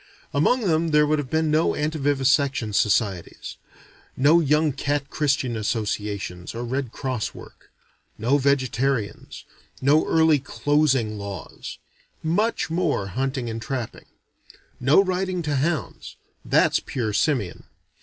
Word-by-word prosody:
Among 155 - +2
them 165 -5 +1
there 150 -1 +4
would 150 0 +1
have 140 -3 -4
been 160 +1 +1
no 155 +2 +2
antivivisection 140 -5 +1
societies: 100 -4 0 0.6
No 150 +6 +5
Young 150 -1 +2
Cat 140 +1 -2
Christian 140 -5 0
Associations 105 -4 -3
or 120 +1 -4
Red 130 0 -3
Cross 130 -5 -3
work: - - -14 0.5
No 125 +6 +2
Vegetarians: 130 -4 -1 0.3
No 145 +4 +3
early 160 -2 +4
closing 135 -6 +1
laws: 100 -1 -7 0.5
Much 175 +3 0
more 160 - 0
hunting 130 +4 -2
and 115 0 -4
trapping: 125 -1 -5 0.7
No 140 +9 +5
riding 185 -1 -2
to 150 -2 -1
hounds; 150 - -2 0.3
that's - - +3
pure 110 -5 -3
simian. 105 - 0
140 Hz, 120 wpm, -24 LUFS, 115-155 Hz, 0.7 s, No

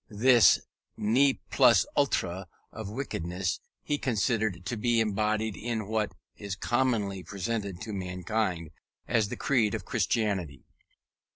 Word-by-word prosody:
This 115 -2 +6 0.4
ne 130 +6 +3
plus - - +5
ultra 95 +1 0 0.2
of 110 -2 -7
wickedness 95 -6 -3 0.2
he 145 -1 -1
considered 110 -5 0
to 120 - -2
be 115 +1 +1
embodied 110 0 0
in 110 -3 -3
what 110 -1 -1 0.2
is 100 -1 -5
commonly 110 -5 0
presented 100 +1 -4
to 110 - -5
mankind 90 -2 -2 0.4
as 110 -4 +1
the - - -5
creed 115 -7 +2
of - - -6
Christianity. 95 - -1
105 Hz, 120 wpm, -28 LUFS, 95-115 Hz, 0.4 s, This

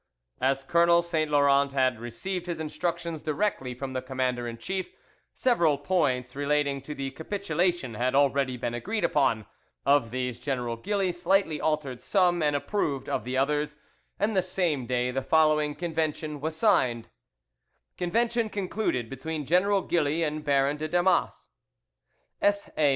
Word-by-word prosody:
As 135 +1 +1
Colonel 170 +3 +4
Saint 160 -3 -1
Laurent 140 -1 +3
had 130 -3 +2
received 175 +10 -5
his 170 -2 -3
instructions 170 0 -3
directly 150 -6 -1
from 130 +1 -5
the 130 - -2
commander 130 -2 -2
in 115 0 -6
chief, 185 +9 -4 0.4
several 170 - +2
points 135 -6 0
relating 140 -1 0
to 150 +3 -7
the 135 0 -4
capitulation 175 - -1
had 125 +4 0
already 140 -2 +2
been 120 0 -3
agreed 205 - -3
upon; 125 -7 +2 0.4
of 140 -5 +4
these 125 0 -3
General 125 -3 -2
Gilly 195 - -1
slightly 175 -2 +1
altered 145 -6 -1
some, 180 -1 +2
and 150 -1 +2
approved 145 -3 -1
of - - -1
the 130 +1 -2
others, 150 +2 0 0.4
and 210 +2 0
the 190 - +4
same 175 -8 -1
day 125 0 0
the 135 +1 -1
following 150 +1 +3
convention 155 -3 -2
was 160 +1 -2
signed: 125 - +2 0.9
"Convention 230 +5 0
concluded 195 - -2
between 145 +4 -5
General 190 +5 +3
Gilly 160 -1 +1
and 155 -1 -2
Baron 140 0 +2
de 155 +1 -3
Damas 175 +3 +1 0.9
"S.A. 200 -7 +2
150 Hz, 145 wpm, -27 LUFS, 130-175 Hz, 0.9 s, Colonel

